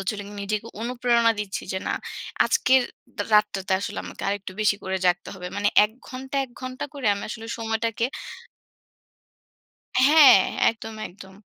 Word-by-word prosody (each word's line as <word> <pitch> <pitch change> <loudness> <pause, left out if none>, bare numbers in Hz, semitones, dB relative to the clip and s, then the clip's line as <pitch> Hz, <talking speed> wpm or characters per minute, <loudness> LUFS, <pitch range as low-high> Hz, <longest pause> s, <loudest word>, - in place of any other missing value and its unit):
সচারাচর 205 +2 -3 0.2
নিজেকে 210 +2 -3 0.2
অনুপ্রেরণা 235 -1 +2
দিচ্ছি 200 -2 -4
যে 190 - -1
না - - 0 0.5
আজকের 260 0 +4 0.5
রাতটাতে 205 -2 +2
আসলে 100 - -4
আমাকে 90 +1 -9
আরেকটু 200 -1 -3
বেশি 205 -1 +3
করে 190 0 -2
জাগতে 175 0 +1
হবে। 180 -1 -7
মানে 205 0 +2 0.2
১ 210 - -2 0.2
ঘণ্টা 265 +2 -6
১ 260 - -16
ঘণ্টা 255 +1 -5
করে 275 -6 -4
আমি 200 - -6
আসলে 225 0 -7
সময়টাকে 225 0 -1 2.0
হ্যাঁ, 280 -5 +8 0.3
একদম, 225 0 -7
একদম। 190 +1 -14
215 Hz, 140 wpm, -24 LUFS, 195-245 Hz, 2.0 s, হ্যাঁ